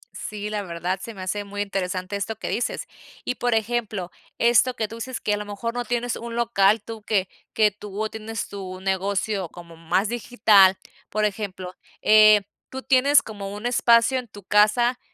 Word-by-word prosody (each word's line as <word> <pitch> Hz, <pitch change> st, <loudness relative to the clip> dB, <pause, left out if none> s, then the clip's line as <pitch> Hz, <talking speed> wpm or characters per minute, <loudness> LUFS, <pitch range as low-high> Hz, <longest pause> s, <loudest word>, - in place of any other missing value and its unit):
Sí, 210 Hz, 0 st, -5 dB
la 210 Hz, -1 st, -2 dB
verdad 175 Hz, +1 st, -3 dB
se 230 Hz, -, -8 dB
me 185 Hz, -, -7 dB
hace 205 Hz, +2 st, -2 dB
muy 205 Hz, 0 st, -5 dB
interesante 185 Hz, -1 st, -3 dB
esto 210 Hz, +2 st, -3 dB
que -, -, -7 dB
dices 245 Hz, -, -2 dB, 0.4 s
y, 250 Hz, -, -1 dB
por 245 Hz, -1 st, 0 dB
ejemplo, 220 Hz, -5 st, -2 dB, 0.3 s
esto 240 Hz, +2 st, +4 dB
que 220 Hz, -3 st, -2 dB
tú 225 Hz, -, -9 dB
dices, 255 Hz, +1 st, -5 dB
que 210 Hz, -, 0 dB
a 205 Hz, -, 0 dB
lo 210 Hz, -, -5 dB
mejor 205 Hz, +3 st, -4 dB
no 245 Hz, 0 st, -3 dB
tienes 245 Hz, 0 st, -2 dB
un 235 Hz, 0 st, -7 dB
local, 220 Hz, -3 st, +3 dB
tú 225 Hz, 0 st, -8 dB
que 195 Hz, -3 st, 0 dB, 0.3 s
que 215 Hz, -1 st, +4 dB
tú 210 Hz, +1 st, -5 dB
atiendes 220 Hz, 0 st, -5 dB
tu 185 Hz, -2 st, -7 dB
negocio 195 Hz, 0 st, -1 dB
como 170 Hz, -1 st, -12 dB
más 175 Hz, +6 st, 0 dB
digital, 210 Hz, -5 st, +4 dB, 0.3 s
por 215 Hz, 0 st, 0 dB
ejemplo, 190 Hz, -3 st, -4 dB, 0.3 s
eh, 215 Hz, -1 st, +7 dB, 0.3 s
¿tú 265 Hz, 0 st, -7 dB
tienes 280 Hz, +2 st, +4 dB
como 200 Hz, -3 st, -7 dB
un 210 Hz, +3 st, -8 dB
espacio 240 Hz, +1 st, +4 dB
en 250 Hz, -, -9 dB
tu 205 Hz, -1 st, -13 dB
casa, 215 Hz, +5 st, +3 dB
210 Hz, 185 wpm, -24 LUFS, 195-235 Hz, 0.4 s, eh